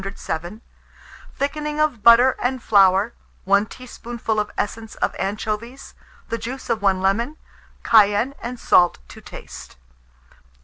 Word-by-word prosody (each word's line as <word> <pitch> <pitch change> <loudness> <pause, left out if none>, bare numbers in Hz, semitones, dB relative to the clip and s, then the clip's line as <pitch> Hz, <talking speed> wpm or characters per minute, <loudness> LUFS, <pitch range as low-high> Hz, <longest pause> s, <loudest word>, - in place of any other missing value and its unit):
107), 190 +1 -6 0.7
thickening 300 +2 -3
of 305 -8 0
butter 235 +4 +7
and 255 0 -2
flour, 195 +1 +4 0.3
1 200 +2 +2
teaspoonful 235 -3 -5
of 210 0 -2
essence 220 +2 -4
of - - -1
anchovies, 215 +6 -4 0.4
the 230 - -3
juice 255 +1 -6
of 225 -2 -1
1 195 -2 +2
lemon, 230 +10 0 0.5
cayenne 215 +4 +4
and 240 +1 -6
salt 175 -5 +3
to - - -13
taste. - - -11
225 Hz, 125 wpm, -21 LUFS, 200-250 Hz, 0.7 s, butter